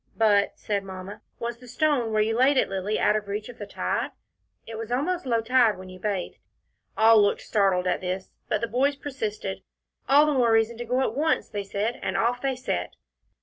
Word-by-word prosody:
"But," 205 -3 +3
said 200 -2 -2
Mamma, 190 +1 -8 0.2
"was 235 0 -4
the 250 - -14
stone 250 -2 +1
where 215 -1 +3
you 225 +1 0
laid 265 +3 +4
it, - - +2
Lilly, 195 +2 -2
out 210 - +3
of 210 -1 -2
reach 210 +3 -4
of 245 - -12
the 205 - -6
tide? - - -2 0.6
It 225 - -8
was 225 +1 -6
almost 320 +6 -1
low 230 -2 +2
tide 235 -2 +3
when 185 0 -10
you 185 0 -11
bathed." 200 -2 -3 0.6
All 220 0 +7
looked 205 - +2
startled 195 -4 +1
at 180 - 0
this, 185 +1 -4 0.2
but 215 - 0
the 230 - -1
boys 265 +5 +1
persisted. 220 -9 -4 0.5
"All 285 +2 +7
the 300 - +1
more 245 -4 +3
reason 225 +1 +3
to 240 - -5
go 250 +3 +1
at 245 - 0
once," 305 +5 0
they 205 -2 -4
said, 205 +4 -2
and - - -2
off 245 +2 +1
they 270 -1 0
set. 255 - -3
225 Hz, 215 wpm, -26 LUFS, 205-250 Hz, 0.6 s, All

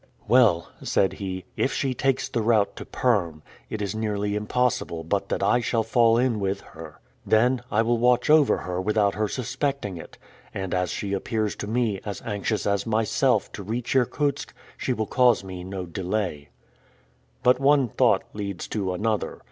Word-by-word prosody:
"Well," 115 -9 +4
said 95 -1 +1
he, 95 -2 -5
"if 135 - 0
she 135 -2 -1
takes 135 +1 0
the 115 - -2
route 110 -2 +2
to - - -7
Perm, 85 -11 0 0.3
it 105 -1 -3
is 100 - -2
nearly 105 -2 -2
impossible 105 -6 -1
but 80 - -1
that - - -1
I 120 - +3
shall 115 -1 0
fall 115 0 +3
in 120 -3 +1
with 100 0 -1
her. 80 -1 -12 0.2
Then, 120 +3 +3
I 110 +2 +2
will 120 0 +1
watch 125 +1 +3
over 150 -2 +5
her 90 0 -3
without 105 0 +2
her 105 +2 -1
suspecting 130 - -3
it; 80 - -11 0.4
and 95 -2 -3
as 90 -1 0
she 100 +6 -3
appears 110 +1 -1
to 105 - -5
me 110 -3 0
as 100 -3 -5
anxious 105 0 -2
as 100 +2 0
myself 110 -1 +1
to - - -7
reach 115 +6 -3
Irkutsk, 140 +3 0 0.2
she - - -2
will 110 -3 -1
cause 120 -1 +3
me 95 -2 -7
no 95 0 -5
delay." 90 -4 -3 0.9
But 125 +1 +4
one 140 -1 +4
thought - - +2
leads 100 -3 -5
to 95 -4 -2
another. 110 +2 -2
110 Hz, 175 wpm, -25 LUFS, 95-120 Hz, 0.9 s, over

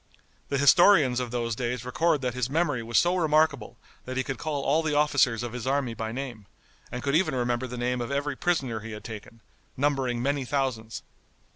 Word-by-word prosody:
The 140 - 0
historians 145 -2 +5
of 125 -1 -3
those 115 -1 -2
days 120 0 -3
record 155 +4 +1
that 125 -2 -2
his 125 0 -2
memory 150 -4 0
was 115 +1 -1
so 175 +1 +4
remarkable 155 -7 +1 0.3
that 130 0 -5
he 130 - +1
could 135 0 -5
call 145 -3 -3
all 150 +4 +2
the 155 -2 -1
officers 140 -6 +2
of 120 -1 -5
his 125 0 -5
army 135 -3 0
by 110 0 -4
name, 120 -5 -6 0.4
and 125 - -5
could 140 - 0
even 165 -3 +2
remember 120 0 -1
the 125 0 -7
name 125 +1 -1
of 120 - -4
every 140 0 -2
prisoner 135 -9 -1
he 110 0 -8
had 105 - -8
taken, 110 +1 -9 0.4
numbering 135 -3 0
many 140 +2 0
thousands. 125 -5 -2
130 Hz, 200 wpm, -27 LUFS, 120-145 Hz, 0.4 s, historians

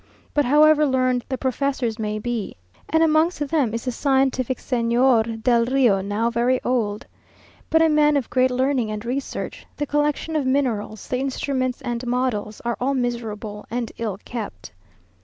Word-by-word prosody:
But 290 -1 +2
however 305 +3 +5
learned 255 -3 +1
the 260 - -2
professors 260 -3 -1
may 215 -1 -2
be, 230 -1 -3 0.3
and 320 +1 +3
amongst 320 +2 +3
them 280 -8 +1
is 230 +2 -4
the 250 - 0
scientific 265 -1 +1
Señor 235 -2 +1
del 235 -2 +3
Rio, 245 -6 +3
now 210 +4 -1
very 245 +2 +2
old, 220 -5 -1 0.6
but 320 0 +4
a - - +5
man 300 -1 +4
of 265 - -2
great 255 0 +3
learning 255 -2 0
and 215 +1 -5
research, 265 +3 -4
the 290 - -1
collection 295 +2 -1
of 290 -4 0
minerals, 235 -6 -1
the 250 - -1
instruments 260 -1 -2
and 240 +1 -3
models, 240 -4 -1
are 235 -1 -1
all 275 +2 +1
miserable 225 -4 -4
and 235 0 -3
ill 215 -4 -2
kept. 210 - -6
250 Hz, 160 wpm, -23 LUFS, 230-275 Hz, 0.6 s, however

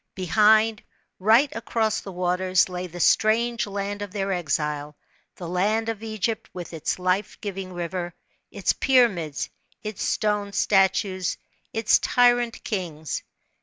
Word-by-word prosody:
Behind 215 +4 +4 0.4
right 225 +9 +4
across 225 -1 -1
the 195 - -8
waters 185 +1 +1
lay 180 0 -5
the 175 0 -9
strange 225 +4 +3
land 200 0 -4
of 205 -2 -5
their 195 -1 -2
exile, 150 -3 -2 0.4
the 175 - -7
land 210 +6 0
of 220 -2 -4
Egypt 220 0 -3
with 175 -1 -7
its 160 - -2
life 185 +2 -1
giving 195 -2 -5
river, 175 0 -4 0.3
its - - 0
pyramids, 210 - +2 0.3
its 215 -2 -5
stone 210 -1 0
statues, 190 -2 +2 0.3
its 225 -1 +3
tyrant 245 -1 +2
kings. 165 -7 -4
195 Hz, 130 wpm, -24 LUFS, 180-220 Hz, 0.4 s, Behind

